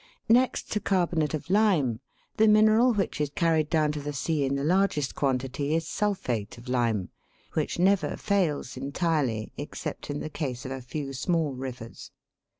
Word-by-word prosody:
Next 250 +2 +3
to 210 - +1
carbonate 170 -6 +1
of 155 - -6
lime, 180 - +3 0.4
the 220 - +5
mineral 215 +3 +5
which 195 -8 -1
is 150 - 0
carried 160 0 +1
down 155 -2 +2
to 150 - -4
the 145 +1 -4
sea 145 +2 0
in 135 0 0
the 140 - -2
largest 170 -4 +1
quantity 135 +2 -1
is 165 0 -1
sulphate 125 - -2
of 120 +2 -13
lime, 115 -6 0 0.4
which 155 - -1
never 190 +2 +2
fails 170 -10 0
entirely 140 -4 -1
except - - -6
in 145 0 -2
the - - -4
case 140 -4 -4
of 130 - -5
a 135 0 -4
few 135 +2 -5
small 155 +1 0
rivers. 125 -3 -7
150 Hz, 165 wpm, -27 LUFS, 130-180 Hz, 0.4 s, the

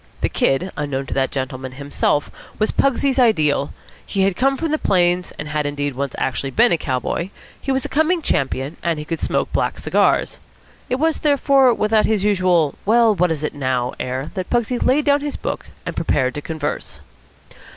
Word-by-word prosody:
The - - +1
Kid, 175 +8 +1
unknown 140 -2 -3
to - - -4
that 135 -1 +1
gentleman 130 -1 -4
himself, 145 +1 -1 0.3
was 215 - +1
Pugsy's 275 0 +1
ideal. 155 - +3 0.3
He 195 -1 +1
came 270 +7 +1
from 325 0 -2
the 310 - +1
Plains; 180 -1 +2
and 150 - -5
had, 150 -1 -1
indeed, 145 -1 -2
once 140 +1 -3
actually 135 +1 -2
been 235 - +3
a 170 - +3
cowboy; 135 +7 -2 0.3
he 270 - -2
was 265 0 0
a - - -1
coming 320 +3 +1
champion; 135 - -1
and 170 -2 0
he 150 - -6
could 165 0 -3
smoke - - -1
black - - 0
cigars. - - +1 0.5
It 250 - +1
was, 315 +4 +1
therefore, 275 -3 +4
without 215 0 +2
his 215 -3 +1
usual 185 -7 +2
well 225 +1 +4
what 180 -2 +2
is 155 -2 -2
it 150 - -2
now? 130 -3 -1
air 130 +3 -3
that 185 -3 -4
Pugsy 240 0 0
laid 285 +4 +2
down 285 0 +3
his 290 0 -4
book, - - -4 0.2
and - - -4
prepared 130 -1 0
to 145 - -5
converse. 155 -1 -4
175 Hz, 190 wpm, -20 LUFS, -, 0.5 s, therefore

